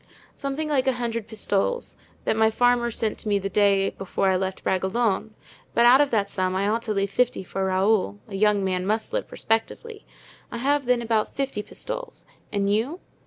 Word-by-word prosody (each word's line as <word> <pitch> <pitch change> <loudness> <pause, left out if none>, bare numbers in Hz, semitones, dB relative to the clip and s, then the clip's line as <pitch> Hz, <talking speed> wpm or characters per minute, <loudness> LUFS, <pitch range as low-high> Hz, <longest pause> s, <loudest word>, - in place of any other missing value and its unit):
"Something 280 +3 -3
like 275 -3 +1
a 265 - +4
hundred 230 -3 -3
pistoles, 220 - -1 0.3
that - - +2
my 220 0 +4
farmer 245 +1 +2
sent 220 -1 -2
to 215 - -4
me 205 - +3
the 195 0 -3
day 200 -1 +3
before 195 0 -1
I - - +2
left 190 0 -3
Bragelonne; 205 +3 0 0.4
but 235 - +5
out 255 +3 +8
of 290 - +2
that 210 -5 +1
sum 185 -2 -1
I 195 +1 +1
ought 225 +2 +1
to - - +2
leave 200 0 0
fifty 245 -2 +1
for 190 +1 -3
Raoul—a 190 - 0
young 205 0 +2
man 185 0 -1
must 220 - -1
live - - -2
respectably. 415 - -2 0.5
I - - -4
have 275 +2 +1
then 250 -1 +2
about 225 -2 0
fifty 270 -6 -2
pistoles. - - -6 0.3
And 200 -1 +1
you?" 255 - -1
220 Hz, 190 wpm, -25 LUFS, 195-245 Hz, 0.5 s, out